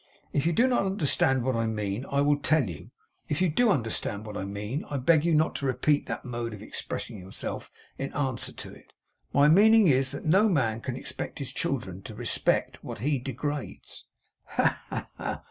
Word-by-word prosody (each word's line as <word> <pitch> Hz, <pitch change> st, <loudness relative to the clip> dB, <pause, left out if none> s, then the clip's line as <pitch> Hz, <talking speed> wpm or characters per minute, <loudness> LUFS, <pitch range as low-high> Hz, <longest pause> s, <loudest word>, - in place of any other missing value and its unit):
'If 145 Hz, +3 st, +1 dB
you -, -, +3 dB
do 235 Hz, +9 st, +4 dB
not 245 Hz, -6 st, +2 dB
understand 140 Hz, -, +2 dB
what 130 Hz, 0 st, 0 dB
I 115 Hz, 0 st, 0 dB
mean, 105 Hz, +2 st, -2 dB
I 140 Hz, 0 st, +2 dB
will 145 Hz, 0 st, +3 dB
tell 145 Hz, -3 st, +2 dB
you. 85 Hz, -4 st, -8 dB, 0.4 s
If 150 Hz, -, 0 dB
you 185 Hz, -1 st, +3 dB
do 230 Hz, +10 st, +3 dB
understand 115 Hz, -, -1 dB
what 105 Hz, -1 st, -7 dB
I 95 Hz, -, -3 dB
mean, 105 Hz, +8 st, -4 dB
I 145 Hz, -, -3 dB
beg 150 Hz, +4 st, +4 dB
you 170 Hz, -1 st, +3 dB
not 155 Hz, +2 st, +3 dB
to 140 Hz, -, -2 dB
repeat 145 Hz, +3 st, +1 dB
that -, -, -4 dB
mode 120 Hz, -2 st, -4 dB
of 105 Hz, -, -11 dB
expressing 110 Hz, 0 st, -5 dB
yourself 95 Hz, +1 st, -6 dB, 0.3 s
in 135 Hz, -, -3 dB
answer 135 Hz, -4 st, -1 dB
to -, -, -9 dB
it. -, -, -18 dB, 0.4 s
My 140 Hz, +1 st, +5 dB
meaning 210 Hz, +4 st, +7 dB
is, 135 Hz, -1 st, +3 dB
that 140 Hz, -, -6 dB
no 195 Hz, +7 st, +5 dB
man 115 Hz, -, +1 dB
can 125 Hz, -, -4 dB
expect -, -, -5 dB
his 135 Hz, -3 st, -4 dB
children 115 Hz, -, -2 dB
to 105 Hz, -, -9 dB
respect 120 Hz, +1 st, 0 dB
what -, -, -6 dB
he 140 Hz, +4 st, 0 dB
degrades.' 140 Hz, +3 st, -5 dB, 0.4 s
'Ha, -, -, +1 dB
ha, -, -, -4 dB
ha! -, -, -3 dB
135 Hz, 200 wpm, -28 LUFS, 115-155 Hz, 0.4 s, meaning